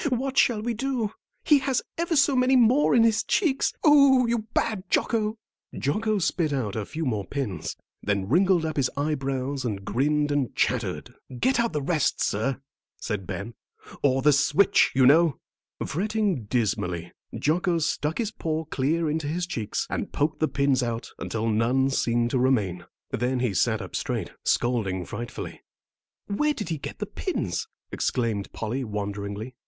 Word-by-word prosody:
"What 260 +1 -1
shall 225 -5 +3
we 240 +1 -1
do? 235 -3 -2 0.3
He 295 -2 +5
has 265 -2 0
ever 335 0 -1
so 280 -1 +4
many 255 +1 +4
more 250 +3 +4
in 230 - +6
his 225 -1 +3
cheeks. 315 -10 +1
Oh, 280 -4 +6
you 230 -2 -1
bad 215 -5 0
Jocko!" 220 -1 +1 0.4
Jocko 215 - 0
spit 170 -3 0
out 120 -8 -2
a 110 -2 -3
few 160 0 -4
more 110 -6 -1
pins, 105 - -4 0.3
then 100 -2 -1
wrinkled 175 - +3
up 155 -1 -3
his 135 -3 +2
eyebrows 135 -2 -2
and 100 -5 -3
grinned 145 +6 +1
and 145 -4 -1
chattered. - - -1 0.3
"Get 260 - +2
the 150 -2 -2
rest 155 -2 +1
out, - - -8
sir," 130 +6 -1 0.4
said 105 -5 -4
Ben, 100 +5 -5 0.5
"or 135 -2 +2
the 150 0 +6
switch, 150 +7 +4
you 130 -1 +5
know." 155 +1 +5 0.5
Fretting 200 - -1
dismally, 90 -7 -1 0.3
Jocko 170 +3 +1
stuck 155 -1 -1
his 225 -2 -1
paw 160 -7 -3
clear 155 +3 0
into 155 0 -1
his 175 +4 -1
cheeks, 110 -11 -3
and - - -3
poked 150 +2 -1
the 155 - +2
pins 140 -3 +1
out 120 -1 -3
until 115 0 -2
none 120 +5 +2
seemed 120 -2 +1
to 130 - +1
remain. 105 -9 +1 0.3
Then 125 +2 0
he 120 -5 0
sat - - +1
up - - -9
quite - - -7
straight, - - -3
scolding 100 -7 0
frightfully. 120 +6 -7 0.6
"Where 300 +9 0
did 210 - -5
he 160 -3 -2
get - - -7
the - - -3
pins?" - - -3 0.2
exclaimed 115 -5 -1
Polly, 120 +5 -3
wonderingly. 105 +1 -4
145 Hz, 165 wpm, -26 LUFS, -, 0.6 s, in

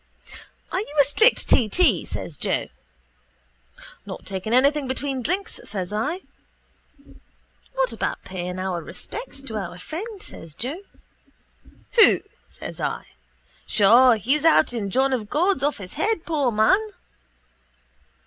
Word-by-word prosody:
—Are 370 - 0
you 305 -7 -6
a - - +9
strict 435 - +3
t.t.? 235 - +3
says 160 - -5
Joe. - - -1 1.3
—Not - - -8
taking 195 +2 -4
anything 280 +3 +3
between 265 0 -2
drinks, 370 - -2
says 195 -2 -4
I. 300 - -1 1.5
—What - - +1
about - - -3
paying 180 -1 -5
our 185 -2 -2
respects 275 - -8
to 225 -5 -5
our 180 -3 -5
friend? 385 - -7
says 165 - -11
Joe. 285 +10 -4 1.2
—Who? - - +7 0.3
says - - -9
I. - - -3 0.6
Sure, 235 +4 +6
he's 265 +8 0
out 315 -5 +4
in 210 -4 -3
John 265 +5 +2
of 215 -5 -2
God's 360 +8 +1
off 290 +1 0
his 185 -3 -9
head, 410 +3 0
poor 295 -6 +1
man. 220 - +4
260 Hz, 130 wpm, -23 LUFS, 200-320 Hz, 1.5 s, a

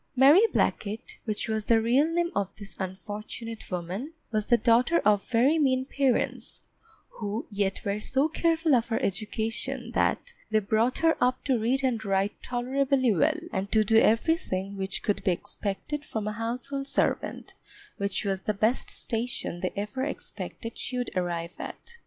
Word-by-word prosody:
Mary 280 +8 +8
Blacket, 215 +2 -1
which 215 -1 -1
was 220 -1 -1
the 230 -1 +5
real 245 +7 +3
name 345 +1 +1
of 200 -2 0
this 200 -1 -9
unfortunate 210 +4 -6
woman, 185 - -4 0.2
was 215 -2 0
the 240 - +5
daughter 245 +8 +4
of 205 -1 +3
very 260 +7 +4
mean 260 -3 +2
parents, 270 -2 0 0.5
who 210 +1 -3
yet 200 -1 -1
were 200 +1 0
so 265 +7 +2
careful 325 -1 +2
of 240 -3 +3
her 225 - 0
education 225 +5 -2
that 485 - 0 0.2
they 215 - +3
brought 220 +4 +1
her 325 0 +3
up 250 +1 +1
to 260 -4 +1
read 255 +5 +1
and 240 -4 0
write 195 0 +1
tolerably 255 0 +1
well, 305 - +2 0.2
and 195 0 -2
to 220 -1 +4
do 220 +2 +4
everything 215 - +1
which 195 0 -2
could 205 - 0
be 185 - +3
expected 205 - -4
from 220 -7 -4
a - - 0
household 245 +5 -3
servant, - - -1 0.4
which 200 +1 -1
was 195 -1 -1
the 210 - -1
best 220 +5 +1
station 230 -6 -2
they 185 - -1
ever 210 +6 -3
expected 235 -4 -6
she 250 - -3
would 245 - -2
arrive 175 -1 -2
at. 470 0 -8
230 Hz, 165 wpm, -28 LUFS, 205-265 Hz, 0.5 s, Mary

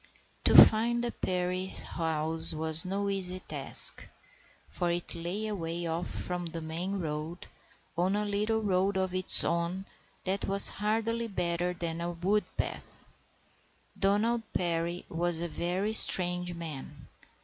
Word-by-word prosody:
To - - +4
find 235 +2 +6
the 240 - -2
Perry 185 0 -3
house 160 -2 -2
was 160 +1 +5
no 200 +2 -3
easy 185 -2 -1
task, - - +4 0.6
for 175 -2 -3
it 170 0 -3
lay 175 +6 -4
away 170 -5 -4
off 165 +1 -3
from 180 -1 -4
the 165 0 -6
main 170 +5 -4
road 160 +1 -6 0.5
on 180 +4 0
a 210 0 -1
little 210 +2 -1
road 190 0 0
of 190 -1 -2
its 185 0 +3
own 170 +3 -2 0.4
that 190 +1 -2
was 195 0 +7
hardly 225 +2 -2
better 180 -2 -2
than 170 -1 -5
a 175 0 -4
wood 195 +5 -1
path. - - -6 0.9
Donald 210 +4 +1
Perry 170 0 -2
was 170 0 -2
a 170 - -3
very 180 +6 -2
strange 180 -4 +4
man. 150 -3 -8
180 Hz, 140 wpm, -28 LUFS, 170-200 Hz, 0.9 s, was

